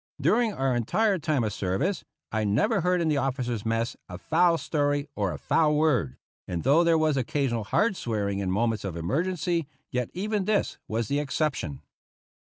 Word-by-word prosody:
Dur 245 - +3
ing 230 -3 +1
our 135 -8 0
entire 190 - +1
time 155 -5 0
of 105 -2 -2
service, 130 - -1 0.3
I 110 -1 0
never 170 - +2
heard 180 +1 +2
in 165 - +1
the 150 -2 +2
officers' 125 -5 -1
mess 115 +1 -1
a 90 - -6
foul 165 - +3
story 145 -2 0
or 100 -3 0
a - - -5
foul 150 -2 +2
word; 135 - +1 0.3
and 85 -2 -3
though 145 +6 +5
there 165 -1 +4
was 155 -3 +2
occasional 130 -5 -1
hard 205 - +2
swearing 100 - -2
in 95 -2 -2
moments 110 +3 0
of 90 -4 -4
emergency, 165 - -1 0.2
yet 125 -2 -1
even 205 +1 -1
this 210 0 0
was 115 0 -1
the 140 +4 0
exception. 140 - -2
140 Hz, 185 wpm, -27 LUFS, 110-170 Hz, 0.3 s, though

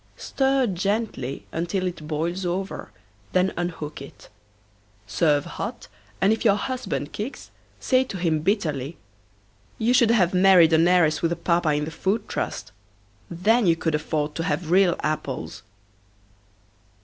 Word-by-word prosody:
Stir 270 -1 +1
gently 195 - -2
until 175 +3 -2
it 170 -4 -5
boils 165 +5 -2
over 185 +2 -3 0.4
then 185 +1 +2
unhook 165 -4 -4
it. 140 - -13 0.8
Serve 145 +6 +1
hot - - -6 0.3
and 200 +3 +4
if 220 - -3
your 210 -4 +5
husband 245 - -3
kicks 220 +7 -6 0.3
say 255 -1 +2
to 200 - -6
him 165 -3 +1
bitterly: 155 - -1 0.8
"You 230 +3 +2
should 235 -2 +5
have 190 -7 +3
married 180 -3 +6
an 165 +2 +5
heiress 165 -4 +3
with 165 - +1
a - - 0
Papa 170 -1 +1
in 150 0 0
the 160 - -6
Food 195 +7 -1
Trust - - -4 0.6
then 210 +6 +2
you 165 - +5
could 165 -1 -2
afford 150 0 -1
to 165 - -3
have 160 +1 -2
real 185 -1 +4
apples!" 150 -4 -3
175 Hz, 145 wpm, -24 LUFS, 155-200 Hz, 0.8 s, married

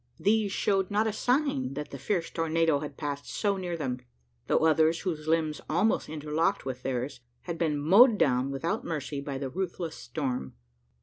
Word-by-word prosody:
These 210 0 +2
showed 195 -1 +1
not 210 +2 +2
a 220 - 0
sign 245 - 0
that 150 +1 -5
the 140 - -7
fierce 175 +2 -1
tornado 165 -2 +2
had 145 -2 -7
passed 145 -1 -4
so 205 -2 0
near 175 -2 -3
them; 130 -5 -2 0.5
though - - +3
others, 160 +1 +4
whose 160 -4 -3
limbs 155 -2 +1
almost 185 +4 +1
interlocked 155 +4 -1
with 130 -1 -4
theirs, 130 0 -3 0.2
had 170 -2 -5
been 155 -3 +1
mowed 205 - +6
down 130 -5 +2
without 170 - -2
mercy 145 -3 -3
by 140 -1 -4
the 135 -1 -4
ruthless 175 -2 -3
storm. 125 - -4
160 Hz, 175 wpm, -29 LUFS, 140-190 Hz, 0.5 s, mowed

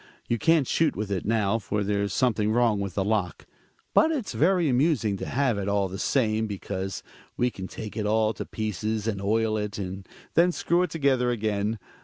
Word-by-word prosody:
You 120 - 0
can't 160 -2 +3
shoot 160 - +2
with 105 -1 -4
it 95 -3 -2
now, 110 -1 +1
for 105 0 -2
there's 100 0 0
something 110 -4 +1
wrong 115 -2 +2
with 100 -3 -4
the 95 - 0
lock. 100 -6 -1 0.5
But 320 - +5
it's 265 -10 -3
very 175 +1 +3
amusing 125 -6 +2
to - - -5
have 125 -5 +1
it, 100 - -3
all 100 -1 +1
the 95 +2 -6
same, 110 -4 +1
because 95 -1 -4 0.3
we 125 0 +1
can 95 -3 -7
take 105 +1 -8
it 105 -2 -1
all 110 0 +2
to - - -6
pieces, 110 0 -3
and 100 -3 -2
oil 110 +2 +1
it, 105 -1 -3
and 95 -1 -6 0.2
then 175 +2 +4
screw 175 0 +1
it 180 - 0
together 135 -5 +1
again. 110 -2 -1
110 Hz, 200 wpm, -26 LUFS, 100-125 Hz, 0.5 s, But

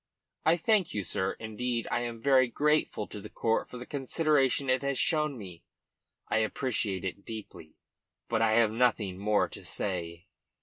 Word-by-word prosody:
"I 165 +2 +5
thank 190 - +2
you, 105 - -1
sir. 95 +2 -1
Indeed, 115 +1 -3
I - - +2
am 120 -1 -4
very 130 0 +4
grateful 150 -4 +1
to 105 - -8
the 105 - -9
court 115 -1 0
for 125 - -8
the 125 - -7
consideration 140 0 +1
it 130 0 +2
has 140 -1 -1
shown 150 -5 +2
me. 90 -6 -10 0.6
I - - +2
appreciate 110 -4 -1
it 95 +2 -5
deeply, 105 -8 -9 0.5
but 115 -1 0
I 110 -1 +4
have 115 -1 +4
nothing 110 -5 +1
more 105 +1 +2
to - - -10
say." 85 -3 -4
115 Hz, 170 wpm, -30 LUFS, 105-135 Hz, 0.6 s, I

